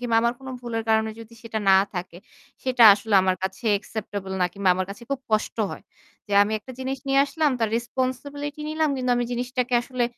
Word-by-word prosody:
কিংবা 235 -2 +1
আমার 235 0 +2
কোন 265 - -9
ভুলের 230 -2 -3
কারণে 220 0 +2
যদি 230 +1 -12
সেটা 225 -1 -4
না 190 - +8 0.2
থাকে 180 -1 -5 0.5
সেটা 255 -2 +2
আসলে 210 +1 -2
আমার 185 -1 +1
কাছে 190 +3 -4
অ্যাকসেপ্টেবল 200 -2 -5
না - - +4
কিংবা 200 -2 0
আমার 185 0 -2
কাছে 205 +4 -9
খুব 275 -1 -1
কষ্ট 215 0 0
হয়। - - -8 0.4
যে 205 - -7
আমি 210 +2 -1
একটা 255 +5 -11
জিনিস 265 +1 -3
নিয়ে 270 0 +3
আসলাম 300 +1 +1
তার 225 -2 +1
রেসপনসিবিলিটি 275 +4 -3
নিলাম, 310 0 +1
কিন্তু 255 -1 -1
আমি 245 - 0
জিনিসটাকে 250 +1 -1
আসলে 255 -1 -1
235 Hz, 200 wpm, -24 LUFS, 210-260 Hz, 0.5 s, না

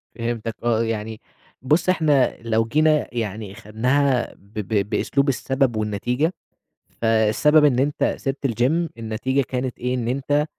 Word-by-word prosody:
فهمتَك 115 -1 -3
آه، 115 -1 +2
يعني 110 -1 -4 0.4
بُص 155 +8 +2
إحنا 150 -8 +2
لو 115 -1 +1
جينا 155 +4 +2
يعني 105 -3 -4
خدناها 125 +5 0
ب 100 +2 -25
ب 105 -1 -1
بأسلوب 140 +5 +1
السبب 135 -1 0
والنتيجة، 120 - -1 0.7
فالسبب 115 +7 +4
إن 130 -4 +3
أنت 145 +3 0
سِبت 140 0 -2
الGym 135 +8 +1
النتيجة 115 +5 -1
كانت 125 -1 -3
إيه، 125 +1 -1
إن 120 -2 -2
أنت 140 +4 0
125 Hz, 135 wpm, -22 LUFS, 110-140 Hz, 0.7 s, فالسبب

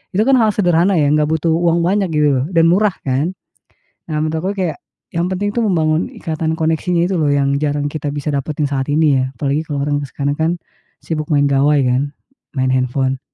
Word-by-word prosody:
itu, 210 - +3
kan, 265 0 +4
hal 215 -3 +2
sederhana 180 0 +3
ya, 145 -2 +3
gak 150 0 +2
butuh 160 +1 0
uang 170 +1 +2
banyak 195 +2 +1
gitu 150 -2 +2
loh, 130 - -1
dan 165 - +5
murah, 200 +1 +2
kan. 145 +8 -1 0.8
Nah, 150 - -1
menurut 155 +1 -1
aku 185 +5 -1
kayak 185 -7 -3 0.3
yang 170 +2 0
penting, 205 +2 -2
tuh, 235 - 0
membangun 165 -2 +1
ikatan 160 - -3
koneksinya 165 +2 +1
itu, 190 - -1
loh, 150 - +2
yang 140 -1 +2
jarang 145 -1 -1
bisa 150 +1 -4
kita 145 0 -3
dapatkan 150 +1 -3
saat 140 -1 -2
ini 145 -3 +3
ya, - - +1
apalagi 145 +3 0
kalau 145 -3 -3
orang 145 0 0
sekarang, 140 0 -2
kan, 160 +2 0 0.5
sibuk 155 -2 -3
main 145 -2 +3
gawai, 140 +2 +3
kan, 135 +4 -1 0.4
main 130 0 +1
handphone. 130 +1 0
155 Hz, 205 wpm, -17 LUFS, 145-175 Hz, 0.8 s, dan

